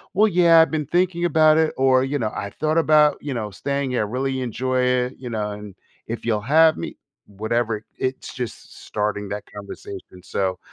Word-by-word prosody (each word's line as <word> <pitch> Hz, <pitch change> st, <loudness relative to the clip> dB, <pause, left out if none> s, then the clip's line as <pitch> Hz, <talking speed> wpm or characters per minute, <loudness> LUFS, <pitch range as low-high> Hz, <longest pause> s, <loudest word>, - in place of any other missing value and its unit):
well, 215 Hz, +3 st, +5 dB
yeah, 170 Hz, -4 st, +5 dB
I've 160 Hz, -, +2 dB
been 150 Hz, -3 st, -2 dB
thinking 175 Hz, 0 st, +1 dB
about 155 Hz, -1 st, +5 dB
it 160 Hz, -1 st, +2 dB
or, 130 Hz, -1 st, +4 dB
you 140 Hz, +2 st, -1 dB
know, 110 Hz, -3 st, -1 dB
I 100 Hz, -, -4 dB
thought 155 Hz, +1 st, +2 dB
about, 150 Hz, -2 st, +4 dB
you 145 Hz, -2 st, -4 dB
know, 110 Hz, -3 st, -3 dB
staying 140 Hz, +5 st, -2 dB
here 125 Hz, -, 0 dB
I -, -, -11 dB
really 130 Hz, +2 st, -2 dB
enjoy 130 Hz, +1 st, -1 dB
it, 125 Hz, 0 st, +1 dB
you 125 Hz, -2 st, -7 dB
know, 105 Hz, -2 st, -2 dB
and 105 Hz, -2 st, -9 dB, 0.3 s
if 115 Hz, +1 st, -5 dB
you'll 110 Hz, -3 st, 0 dB
have 160 Hz, -1 st, +7 dB
me. -, -, -6 dB, 0.3 s
Whatever 110 Hz, +1 st, -2 dB
it's 130 Hz, 0 st, -3 dB
just 125 Hz, -4 st, -7 dB
starting 105 Hz, -1 st, -2 dB
that 105 Hz, 0 st, -4 dB
conversation 100 Hz, -2 st, -9 dB
so 95 Hz, -2 st, -2 dB
130 Hz, 195 wpm, -22 LUFS, 105-155 Hz, 0.3 s, have